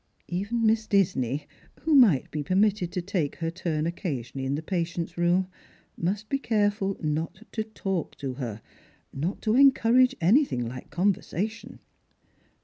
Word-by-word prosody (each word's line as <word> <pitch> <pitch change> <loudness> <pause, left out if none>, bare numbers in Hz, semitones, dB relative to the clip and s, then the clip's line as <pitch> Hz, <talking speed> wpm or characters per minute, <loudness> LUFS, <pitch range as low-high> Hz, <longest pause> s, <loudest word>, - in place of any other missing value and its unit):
Even_ 205 +6 -2
Miss 220 0 +2
Disney, 145 - +1 0.3
who 315 - +1
might 215 - +5
be 150 - -2
permitted 190 +2 +1
to 180 - -3
take 175 -6 -1
her 165 -1 -3
turn 160 -3 -2
occasionally 135 - -4
in 135 - 0
the 155 - -4
patient's 170 -1 -3
room, 175 +2 +2 0.5
must 195 +5 -2
he 275 - +1
careful 205 -5 0
not 160 +6 -2
to 220 - -2
talk 195 -5 -4
to 135 -2 -4
her 115 -5 -6 0.2
— - - -35
not 160 +8 -3
to 215 - +2
encourage 255 -1 +5
anything 180 - +3
like 125 +2 -8
conversation. 200 +3 -2
180 Hz, 145 wpm, -27 LUFS, 155-215 Hz, 0.5 s, might